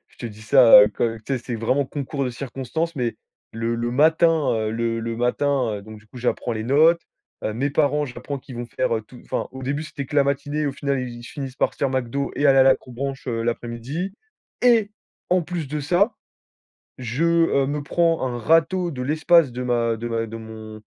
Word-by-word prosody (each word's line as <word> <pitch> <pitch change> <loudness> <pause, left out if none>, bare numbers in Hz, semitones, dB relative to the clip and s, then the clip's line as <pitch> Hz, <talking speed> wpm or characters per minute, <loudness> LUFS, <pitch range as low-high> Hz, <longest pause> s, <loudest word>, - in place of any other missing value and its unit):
je - - -27
te 120 - -5
dis 110 -1 -10
ça, 120 -1 +8
heu, 105 0 +2
tu 115 -1 -1
sais, 135 -2 0
c'est 120 0 -6
vraiment 130 +5 +1
concours 140 +1 -4
de 125 - -2
circonstances, 135 +6 -4
mais 120 -3 -2 0.4
le 115 +1 -2
le 120 +1 -2
matin, 160 +6 +4 0.2
heu, 110 -1 -1
le 115 0 -1
le 115 0 -4
matin, 125 0 +1
heu, 100 - -8
donc 110 +1 -11
du 110 - -21
coup, 110 - -16
j'apprends 120 0 -1
les 110 -1 -4
notes, 155 +7 +4 0.4
heu, 110 - -1
mes 135 +5 -1
parents 150 0 +2
j'apprends 140 +1 -6
qu'ils 130 -1 -11
vont 120 0 -5
faire 130 +2 -2 0.2
tout 125 +1 -14
enfin - - -3
au 130 0 -8
début, 140 +3 -2
c'était 155 -3 -6
que 145 - -5
la 140 - +5
matinée, 145 +2 -1
au 140 - -1
final 140 -1 -1
ils 120 -2 -6
finissent 135 0 -7
par - - +1
se - - -23
faire 140 - +1
McDo 130 +1 -2
et 145 - +2
aller 135 -1 +6
à - - +8
l'accrobranche, 135 +2 0
heu, 115 -2 -2
l'après-midi 120 +10 -3 0.5
et 230 -4 +4 0.4
en 180 0 +3
plus 165 -3 -4
de 150 +2 -3
ça, 175 - +2 0.8
je, 125 +5 -2
heu, 165 -5 +3
me 145 +1 -2
prends 165 -1 +1
un 120 -1 -3
râteau 165 +7 +2
de 130 -5 -5
l'espace 155 +2 +4
de 125 +1 -4
ma 120 -2 +1
de 120 +2 -5
ma 115 -1 -1
de 115 +1 -7
mon 110 -1 -9
130 Hz, 215 wpm, -23 LUFS, 120-150 Hz, 0.8 s, ça